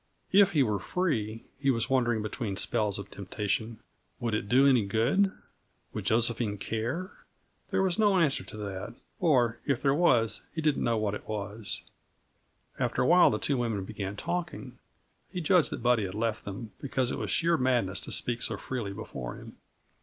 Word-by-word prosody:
If 195 0 +6
he 145 -4 +4
were 105 -4 0
free, 115 - -2
he 140 -1 +1
was 115 -3 +2
wondering 120 -4 +1
between 110 -2 -3
spells 105 0 +1
of 100 0 -8
temptation, 105 +3 -3 0.4
would 120 -3 -2
it 105 -1 -2
do 130 +3 +5
any 130 -5 +5
good? 120 - +2 0.6
Would - - -5
Josephine 115 -2 +1
care? 115 - -3 0.6
There - - +1
was 185 +1 0
no 205 -3 +4
answer 150 -6 +2
to - - -10
that, 100 -3 -6 0.2
or 125 -9 +3
if 140 -4 +1
there 135 -1 +4
was 125 -9 +3
he - - -2
did 150 -2 +2
not - - -2
know 115 -1 +1
what 105 -1 0
it - - -7
was. 105 0 -4 1.0
After - - +1
awhile 175 +7 +6
the 105 - 0
two 140 +4 0
women 115 -5 -1
began 100 -1 -5
talking; 150 -4 -4 0.5
he 180 - -3
judged 175 0 +3
that - - -6
Buddy 120 -4 +3
had 95 +1 -6
left 110 0 -2
them, 100 +2 -6
because 130 -3 0
it - - -3
was - - -3
sheer 170 0 +3
madness 120 - +1
to - - -5
speak 120 -1 +1
so - - +1
freely 115 -7 -4
before 70 - -6
him. - - -12
115 Hz, 185 wpm, -29 LUFS, 105-140 Hz, 1.0 s, If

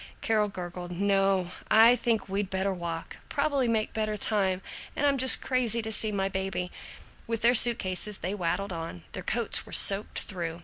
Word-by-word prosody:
Carol 215 -2 +1
gurgled, 180 -2 -7
"No, 195 -1 +1 0.2
I 230 +3 +7
think 230 -4 -1
we'd 195 0 -2
better 190 +1 -1
walk; 170 -2 -6
probably 285 -3 0
make 220 -2 -1
better 215 -1 -2
time, 190 -3 0 0.3
and 290 - 0
I'm 280 -2 +2
just 260 +1 +6
crazy 240 -3 +1
to 220 - -4
see 215 0 -1
my 195 -1 -1
baby." 190 -2 -3 0.6
With 230 -1 -3
their 240 +1 +5
suit 240 0 +6
cases 190 +1 -3
they 185 +3 -4
waddled 190 +1 -2
on. 165 - -7
Their - - -6
coats - - 0
were - - -13
soaked 200 +1 +4
through. 170 -3 -5
200 Hz, 180 wpm, -27 LUFS, 185-225 Hz, 0.6 s, I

